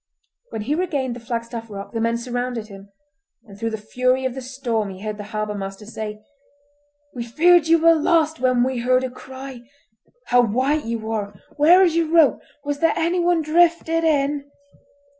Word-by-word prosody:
When 215 - -5
he 275 +7 -1
regained 290 -8 -1
the - - -8
Flagstaff 230 0 -5
Rock 200 -1 -8
the 225 - -3
men 230 +1 +1
surrounded 245 -2 -4
him, 195 0 -12 0.5
and 205 -5 -14
through 225 0 -1
the 220 - -4
fury 255 +4 0
of 260 - -1
the 265 - -6
storm 245 -5 -3
he 190 0 -10
heard 215 0 -5
the 205 - -6
harbour 215 0 -3
master 195 +1 -7
say:— 215 -1 -7 0.9
"We 240 - -4
feared 325 +7 +4
you 330 +1 +5
were 330 +1 +5
lost 320 0 +2
when 255 -1 +2
we 260 -1 -1
heard 255 +2 +2
a 260 - -3
cry! 260 0 -10 0.6
How 245 0 +4
white 260 +6 0
you 225 -1 -4
are! 205 -2 -3 0.2
Where 340 +6 +6
is 340 -3 +2
your 335 -1 +2
rope? 320 -3 +4 0.2
Was 290 0 -3
there 330 0 +2
anyone 345 0 +1
drifted 330 +1 +2
in?" 290 -2 +1
255 Hz, 180 wpm, -22 LUFS, 225-310 Hz, 0.9 s, Where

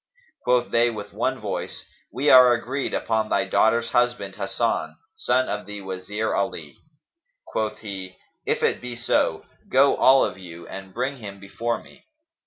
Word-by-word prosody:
Quoth 125 -1 +2
they 120 +1 +4
with 105 -3 -7
one - - -1
voice, - - -5 0.3
"We 135 +6 +2
are 125 -1 +9
agreed 130 +4 -2
upon 110 -1 -1
thy 100 -1 +1
daughter's 115 +4 +2
husband 120 -6 0
Hasan, 105 +3 -1 0.2
son 130 - +1
of 105 0 -4
the 105 -1 -6
Wazir 95 +3 -3
Ali." 80 -7 -3 0.7
Quoth 110 -1 -2
he, 95 -3 -7 0.3
"If - - -1
it - - +1
be 125 -1 -6
so, 120 0 0 0.2
go 135 +2 +5
all 135 +1 +5
of - - -6
you 85 -2 -10
and 95 0 -9
bring 130 +6 -2
him 100 -4 -9
before 115 +4 -3
me." - - -19
110 Hz, 160 wpm, -24 LUFS, 100-125 Hz, 0.7 s, are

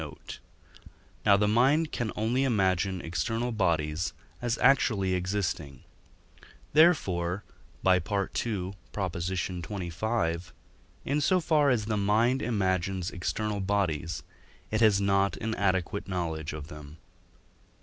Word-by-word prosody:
note); 75 -3 -9 0.9
now 100 -1 +7
the 105 +1 +2
mind 135 +9 +3
can 120 -3 -2
only 120 +5 +1
imagine 95 -6 +1
external 115 +8 -2
bodies 85 -6 0 0.3
as 120 -1 0
actually 110 -8 +3
existing. 90 -7 -2 0.9
Therefore 100 - +3 0.4
(by 95 -1 +5
II. - - -2 0.9
xxv.), 90 0 -2 0.5
in 145 +2 0
so 185 +5 +3
far 150 -4 +3
as 115 -5 +1
the 105 -1 -1
mind 110 +6 +2
imagines 95 -4 0
external 100 +4 -2
bodies, 95 -5 -1 0.5
it 110 +1 0
has 105 -3 +5
not 100 -1 +2
an 110 0 -3
adequate 95 -1 0
knowledge 80 -4 -3
of 75 -1 -7
them. 75 -1 -11
100 Hz, 110 wpm, -28 LUFS, 85-110 Hz, 0.9 s, now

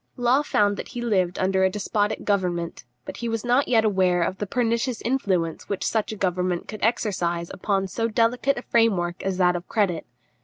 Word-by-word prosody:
Law 245 +3 +3
found 205 -8 +1
that - - -6
he 245 - -7
lived 185 -6 +1
under 190 0 +1
a 190 - +4
despotic 205 +2 -1
government; 175 -8 -1 0.2
but - - -7
he 235 0 -3
was 225 0 -3
not 250 +3 +3
yet 225 -3 +3
aware 185 -4 +2
of 185 +3 -3
the 205 - -3
pernicious 235 +1 0
influence 190 -10 -1
which 200 - -2
such 220 -1 0
a - - -4
government 180 -2 -1
could 215 - -8
exercise 175 -7 0
upon 195 0 -1
so 225 +5 -1
delicate 235 +4 +1
a 240 - -5
framework 190 -7 +1
as 190 -1 -2
that 180 -1 +3
of 175 0 -5
credit. 195 - 0
200 Hz, 195 wpm, -24 LUFS, 180-230 Hz, 0.2 s, a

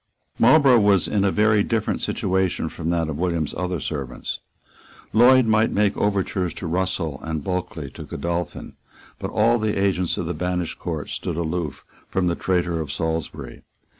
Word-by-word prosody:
Marlborough 130 0 +6
was 100 -3 +3
in 100 -2 +1
a 100 - +3
very 105 +1 +3
different 115 +1 -1
situation 95 -1 0
from 80 - -4
that 85 -2 +1
of 80 -1 -4
William's 85 -4 -1
other 90 -1 -2
servants. 70 -5 -4 0.7
Lloyd 125 +3 +6
might 110 0 +3
make 105 -1 +1
overtures 95 -4 0
to - - -6
Russell, 85 -4 -1
and 80 -2 -4
Bulkeley 90 -6 -3
to - - -9
Godolphin. 85 0 -4 0.5
But - - -4
all 120 +1 +3
the 110 -1 0
agents 95 -3 +1
of - - -2
the - - -2
banished 90 -2 -2
Court - - -4
stood - - -3
aloof 85 -2 -3 0.2
from 95 - 0
the 85 - +2
traitor 90 -3 0
of 75 -3 -5
Salisbury. 75 -4 -4
90 Hz, 165 wpm, -23 LUFS, 80-100 Hz, 0.7 s, Marlborough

